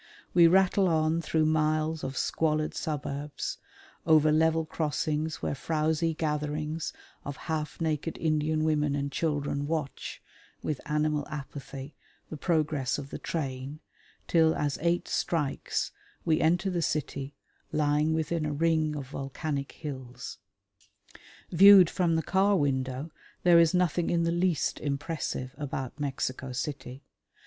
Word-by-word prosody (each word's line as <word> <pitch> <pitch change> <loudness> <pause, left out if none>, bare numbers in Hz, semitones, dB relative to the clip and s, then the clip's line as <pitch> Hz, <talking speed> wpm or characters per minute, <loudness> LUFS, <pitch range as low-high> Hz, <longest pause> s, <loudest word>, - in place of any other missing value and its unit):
We 170 -1 +7
rattle 190 +2 +4
on 160 0 +2
through 155 0 +1
miles 155 0 +1
of 135 0 -4
squalid 155 -1 0
suburbs, 145 -2 -4 0.5
over 155 -1 +6
level 160 +1 +3
crossings 155 0 -2
where - - 0
frowsy 160 +2 0
gatherings 150 0 -2 0.3
of 140 -1 -6
half 155 -2 -3
naked 160 -1 -1
Indian 155 0 +1
women 150 -2 +1
and 140 0 -2
children 145 -2 -1
watch, 155 -3 -3 0.4
with 150 -3 -2
animal 150 -1 0
apathy, 140 -1 -7 0.4
the - - -4
progress 150 -5 0
of 140 -1 -7
the - - -5
train, 140 -2 -4 0.5
till 160 -1 +4
as 145 -1 -1
eight 170 +1 +1
strikes 150 -5 -1 0.3
we 160 -2 +2
enter 175 +4 +2
the 175 -1 0
city 140 -3 -2 0.4
lying 150 +1 +2
within 160 +1 -1
a 150 -1 -1
ring 155 0 +1
of 140 -3 -6
volcanic 140 +1 -4
hills. 130 -5 -7 1.1
Viewed 190 0 +8
from 175 -3 +1
the 160 - +1
car 195 +1 +3
window 135 -1 -1 0.3
there 175 -1 +7
is 165 +1 +4
nothing 175 -1 +1
in 170 -1 +2
the 165 - +1
least 175 -2 +1
impressive 140 -3 -3
about 145 -2 -4
Mexico 135 -2 -3
City. 135 0 -5
155 Hz, 130 wpm, -29 LUFS, 145-165 Hz, 1.1 s, Viewed